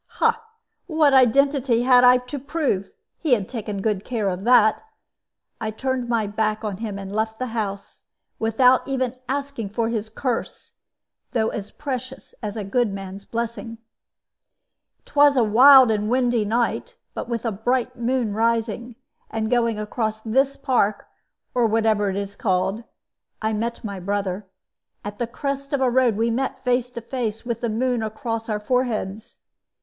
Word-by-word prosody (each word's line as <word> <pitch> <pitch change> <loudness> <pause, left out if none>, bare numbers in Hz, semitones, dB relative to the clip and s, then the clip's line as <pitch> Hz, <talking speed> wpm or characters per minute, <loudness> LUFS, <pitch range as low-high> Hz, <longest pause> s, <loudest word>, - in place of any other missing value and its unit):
"What 315 -4 +3
identity 265 -1 +4
had 250 -1 +6
I 250 0 +8
to 250 +3 -6
prove? 275 - -1 0.3
He 305 -6 +2
had 200 -5 -4
taken 210 -5 -5
good 210 -3 0
care 220 -5 -1
of 185 +2 -4
that. 225 -3 +5 0.8
I 220 - -1
turned 255 +2 -2
my 230 -3 +1
back 215 +1 -1
on 205 -3 -3
him 210 -2 -5
and 195 0 -7
left 220 +1 -1
the 255 - -2
house, 200 -3 -5 0.3
without 250 +3 +3
even 260 -2 -1
asking 280 -6 -3
for 225 +2 -1
his 220 -2 -3
curse, 240 +1 -4 0.6
though 225 -2 +1
as 210 -1 -5
precious 265 -2 -6
as 210 -1 -4
a 210 - -3
good 220 +3 0
man's 195 0 -7
blessing. 230 0 -4 1.3
"It - - -22
was 290 -1 +6
a 245 - +5
wild 255 +3 +8
and 210 0 0
windy 245 -3 +2
night, 240 - -1 0.2
but - - -5
with 235 0 -3
a 230 - +1
bright 245 +4 -1
moon 240 -2 -1
rising, 230 +1 -1 0.3
and 220 0 -2
going 235 -3 +2
across 215 +1 -2
this 265 +5 +1
park 240 -7 +1 0.5
or 245 -2 +3
whatever 220 -2 +2
it 190 - -3
is 200 0 -4
called 195 -1 0 0.6
I 220 0 -1
met 230 +2 -3
my 200 -3 -5
brother. 195 0 -3 0.6
At 205 +2 -6
a 240 - 0
crest 275 +3 -4
of 280 - +2
the 260 -2 +2
road 245 -4 +3
we 230 +1 +1
met 260 +3 -2
face 250 -1 +1
to 235 - -5
face, 230 -2 -4
with 235 -2 -3
the 235 - -1
moon 245 +2 0
across 225 +1 -4
our 210 -1 -1
foreheads. 220 -3 -2
230 Hz, 165 wpm, -23 LUFS, 215-255 Hz, 1.3 s, I